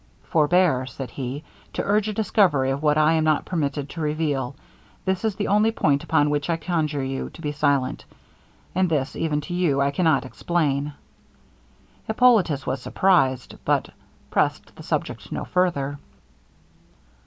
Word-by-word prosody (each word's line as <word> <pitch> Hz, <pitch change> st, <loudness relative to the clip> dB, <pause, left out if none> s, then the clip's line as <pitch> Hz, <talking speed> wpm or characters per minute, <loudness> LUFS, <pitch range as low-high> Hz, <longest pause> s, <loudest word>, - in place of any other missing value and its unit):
'Forbear,' 155 Hz, -4 st, +2 dB
said 130 Hz, -1 st, -7 dB
he, 135 Hz, +2 st, -5 dB, 0.3 s
'to -, -, -2 dB
urge 210 Hz, +1 st, +1 dB
a -, -, -2 dB
discovery 185 Hz, -11 st, +2 dB
of 135 Hz, +1 st, -2 dB
what 150 Hz, -1 st, +3 dB
I 155 Hz, +1 st, +4 dB
am 160 Hz, -1 st, +2 dB
not 155 Hz, -1 st, +2 dB
permitted 145 Hz, -5 st, -2 dB
to 165 Hz, -, -6 dB
reveal; 150 Hz, -4 st, -1 dB, 0.5 s
this 190 Hz, +1 st, 0 dB
is 220 Hz, -3 st, 0 dB
the 205 Hz, -, -2 dB
only 210 Hz, +2 st, +4 dB
point 145 Hz, -10 st, +1 dB
upon 150 Hz, -2 st, +2 dB
which 145 Hz, +2 st, -1 dB
I 165 Hz, -, +1 dB
conjure 155 Hz, -4 st, -1 dB
you 135 Hz, 0 st, -3 dB
to -, -, -15 dB
be 150 Hz, -, -1 dB
silent, 145 Hz, -3 st, 0 dB, 0.7 s
and 185 Hz, 0 st, +2 dB
this 150 Hz, -3 st, -1 dB
even 150 Hz, -2 st, -1 dB
to 175 Hz, +5 st, -7 dB
you, 170 Hz, -6 st, +1 dB
I 140 Hz, 0 st, +2 dB
cannot 155 Hz, -3 st, +2 dB
explain.' 145 Hz, -1 st, -1 dB, 1.1 s
Hippolitus 220 Hz, -, +3 dB
was 130 Hz, 0 st, -2 dB
surprized, 135 Hz, -8 st, +1 dB
but -, -, +1 dB, 0.4 s
pressed -, -, 0 dB
the -, -, -11 dB
subject -, -, -3 dB
no -, -, -3 dB
farther. 145 Hz, -6 st, 0 dB
150 Hz, 155 wpm, -24 LUFS, 140-180 Hz, 1.1 s, I